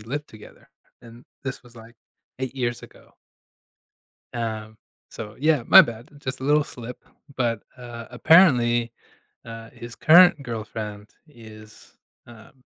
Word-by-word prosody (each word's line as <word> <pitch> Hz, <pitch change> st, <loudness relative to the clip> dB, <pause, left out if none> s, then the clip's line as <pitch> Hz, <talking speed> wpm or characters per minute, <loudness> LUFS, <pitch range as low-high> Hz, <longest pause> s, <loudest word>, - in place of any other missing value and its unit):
lived 140 Hz, +7 st, -6 dB
together, 110 Hz, -1 st, -16 dB, 0.3 s
and 120 Hz, 0 st, -14 dB, 0.2 s
this 135 Hz, -1 st, -5 dB
was, 120 Hz, -1 st, -19 dB
like, 115 Hz, +1 st, -14 dB, 0.5 s
8 130 Hz, 0 st, -4 dB
years 120 Hz, -2 st, -3 dB
ago. -, -, -17 dB, 1.2 s
Um, 110 Hz, -2 st, -5 dB, 0.3 s
so, 110 Hz, -2 st, -9 dB
yeah, 155 Hz, -3 st, +2 dB
my -, -, +10 dB
bad, 120 Hz, +4 st, -6 dB
just 130 Hz, -1 st, -6 dB
a -, -, -6 dB
little 150 Hz, +2 st, +3 dB
slip, 125 Hz, -2 st, -10 dB, 0.3 s
but, 115 Hz, -4 st, -1 dB, 0.2 s
uh, 120 Hz, -1 st, -9 dB
apparently, 120 Hz, -5 st, +4 dB, 0.5 s
uh, 115 Hz, 0 st, -10 dB
his 120 Hz, 0 st, -11 dB
current 170 Hz, -1 st, +6 dB
girlfriend 110 Hz, -3 st, -7 dB, 0.2 s
is, 110 Hz, -5 st, -16 dB, 0.3 s
uh, 115 Hz, -2 st, -15 dB
120 Hz, 130 wpm, -23 LUFS, 115-130 Hz, 1.2 s, my